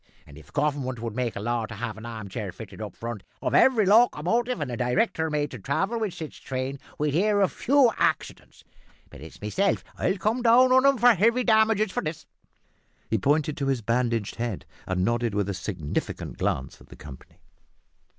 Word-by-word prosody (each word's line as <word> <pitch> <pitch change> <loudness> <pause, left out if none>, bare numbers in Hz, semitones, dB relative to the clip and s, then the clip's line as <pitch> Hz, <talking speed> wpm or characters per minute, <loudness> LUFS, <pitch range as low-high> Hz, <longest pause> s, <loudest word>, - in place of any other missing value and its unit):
And 70 - -15
if 75 -1 -15
Government 140 -4 -1
would 115 -2 -5
make 125 -2 -2
a - - -4
law 115 +1 -1
to 110 - -8
have 115 0 -4
an 110 +1 -9
arm 110 -3 -7
chair 95 - -5
fitted - - -10
up - - -6
in - - -30
front 115 -3 -6 0.2
of - - -2
every 235 -6 +5
locomotive 230 +2 +3
and 145 -4 -3
a - - -3
director 130 - 0
made 150 -1 -1
to 125 - -8
travel 195 - -1
with 215 -5 -2
sich 160 -2 -8
train, 130 +1 -4 0.2
we'd 150 -1 0
hear 205 +5 +2
of 195 - +3
fewer 265 -3 +3
accidents. - - -2 0.5
But 70 - -12
it's 80 - -12
meself 190 - 0 0.2
'll 195 - +1
come 215 +6 0
down 245 +2 +5
on 260 +1 +6
'em 275 -1 +4
for 240 +1 +6
heavy 230 +5 +2
damages 220 -3 +3
for - - -2
this." 155 0 -5 0.9
He 110 - +2
pointed 150 +5 +1
to 140 - -2
his 130 -4 0
bandaged 115 -2 -1
head, 115 -5 -3 0.2
and 95 0 0
nodded 120 -1 0
with 100 -2 0
a - - -1
significant 90 -4 -4
glance 65 0 -2
at - - -17
the - - -12
company. 65 -3 -13
140 Hz, 200 wpm, -26 LUFS, -, 0.9 s, on